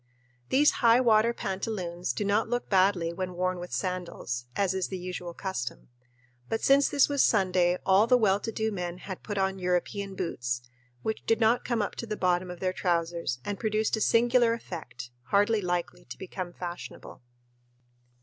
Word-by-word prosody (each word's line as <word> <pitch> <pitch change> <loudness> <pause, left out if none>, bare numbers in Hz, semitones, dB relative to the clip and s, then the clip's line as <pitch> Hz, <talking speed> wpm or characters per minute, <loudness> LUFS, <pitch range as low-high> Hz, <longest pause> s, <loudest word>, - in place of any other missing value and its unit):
These 290 +3 +5
"high 235 0 +6
water" 230 -2 +4
pantaloons 190 - -3
do 205 - -3
not 210 +3 +1
look 245 0 -2
badly 185 -3 +3
when 180 0 -4
worn 185 0 -1
with 175 0 -7
sandals, 175 -10 -3
as 195 -2 +1
is 190 -1 -1
the 190 - -5
usual 180 -1 -6
custom; 190 -15 -5 0.6
but 225 - -2
since 275 +1 +5
this 285 - +4
was 285 -2 +1
Sunday 180 -3 +3
all 195 +3 +5
the 250 - +6
well 205 -4 +3
to 225 - -4
do 220 0 -1
men 180 -3 -4
had 190 0 -8
put 205 -2 -5
on 190 0 0
European 190 +2 -1
boots, 120 -9 -3 0.4
which 220 - -3
did 225 -1 +3
not 230 +1 +3
come 235 -3 0
up - - -4
to 230 - -5
the 215 -1 -3
bottom 180 0 +1
of 180 -1 -7
their 185 -1 -1
trousers 170 -7 -1
and 205 -1 -3
produced 215 0 +1
a 220 - -4
singular 240 +1 +4
effect, 125 - -7
hardly 205 +2 +2
likely 175 -2 -2
to - - -9
become 185 -1 -6
fashionable. 175 -5 -8
190 Hz, 180 wpm, -28 LUFS, 175-220 Hz, 0.6 s, high